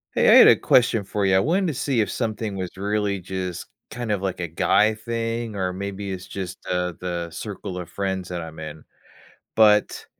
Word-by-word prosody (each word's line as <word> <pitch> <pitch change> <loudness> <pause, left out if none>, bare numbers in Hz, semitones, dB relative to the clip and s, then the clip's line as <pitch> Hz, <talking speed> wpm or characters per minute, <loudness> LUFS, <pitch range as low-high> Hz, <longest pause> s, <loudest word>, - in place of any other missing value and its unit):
Hey, - - +3
I - - +8
had - - +9
a - - +8
question 115 -4 +3
for 100 +1 -3
you, 95 - +3
I - - +5
wanted 180 - +1
to 160 - -1
see 135 -3 0
if 105 - -1
something 110 -3 -3
was 95 -2 -5
really 100 0 -1
just, 90 -1 -5 0.2
kind 120 -1 -4
of, 100 -3 0
like, 95 -2 -2
a 85 - -2
guy 95 +6 +3
thing 115 0 -3
or 95 -2 -1
maybe 100 +1 -5
it's 95 0 -6
just, 95 -2 -6
uh, 90 -1 -1
the 85 -2 -3
circle 100 +1 -6
of 90 -2 -6
friends 95 0 -3
that 90 -1 -4
I'm 80 -1 -9
in. 80 -1 -8 0.7
But, 105 -1 +4
100 Hz, 205 wpm, -23 LUFS, 90-110 Hz, 0.7 s, had